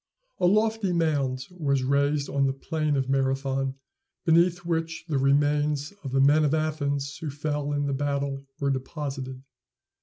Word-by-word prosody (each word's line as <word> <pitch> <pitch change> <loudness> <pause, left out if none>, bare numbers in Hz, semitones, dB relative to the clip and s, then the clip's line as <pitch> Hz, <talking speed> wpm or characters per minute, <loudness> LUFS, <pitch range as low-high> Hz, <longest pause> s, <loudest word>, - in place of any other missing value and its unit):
A 180 - +4
lofty 215 -1 +2
mound 140 -6 0
was 140 -7 0
raised 140 +2 +1
on 140 -1 +1
the 135 - 0
plain 155 +1 -1
of 135 -2 0
Marathon, 135 0 0 0.5
beneath 170 +1 +3
which 165 -1 -2
the 145 -5 0
remains 145 +2 +2
of 135 - -5
the 135 - +2
men 145 +3 +5
of 150 +1 +2
Athens 145 -3 -1
who 160 - -5
fell 145 0 -2
in 145 0 0
the 140 - -1
battle 140 0 -1 0.2
were 140 -1 +1
deposited. 135 -1 -4
145 Hz, 155 wpm, -26 LUFS, 135-155 Hz, 0.5 s, men